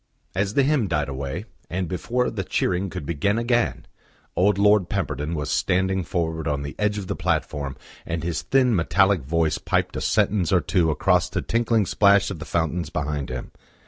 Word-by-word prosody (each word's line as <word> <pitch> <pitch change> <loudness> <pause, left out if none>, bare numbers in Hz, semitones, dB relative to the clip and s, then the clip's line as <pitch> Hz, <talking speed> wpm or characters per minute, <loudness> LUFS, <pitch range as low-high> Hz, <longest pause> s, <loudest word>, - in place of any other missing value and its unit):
As 95 +2 -1
the 140 - +4
hymn 135 -6 +2
died 75 -4 -1
away, 70 +8 -4 0.2
and 90 +1 -2
before 120 +8 -1
the 100 -3 -3
cheering 95 +1 0
could 75 - -6
begin 85 +7 0
again, 120 0 0 0.5
old 100 +2 +3
Lord 100 -3 +4
Pemberton 80 -5 -2
was 75 -2 -3
standing 95 0 +1
forward 80 -2 -2
on 70 -2 -1
the 70 - -5
edge 105 0 +1
of 100 - -4
the - - -3
platform, 75 -5 -2 0.3
and 80 -1 -4
his 85 -1 -2
thin, 130 -4 +3
metallic 95 +2 +3
voice 80 +3 0
piped - - -1
a - - -3
sentence 95 -6 +1
or - - +5
two 85 -3 +1
across 90 +2 +2
the - - -2
tinkling 115 -2 +1
splash 100 +1 +4
of 90 - -6
the 85 - -7
fountains 85 +1 -1
behind 75 -2 -3
him. 65 0 -6
90 Hz, 185 wpm, -24 LUFS, 80-100 Hz, 0.5 s, or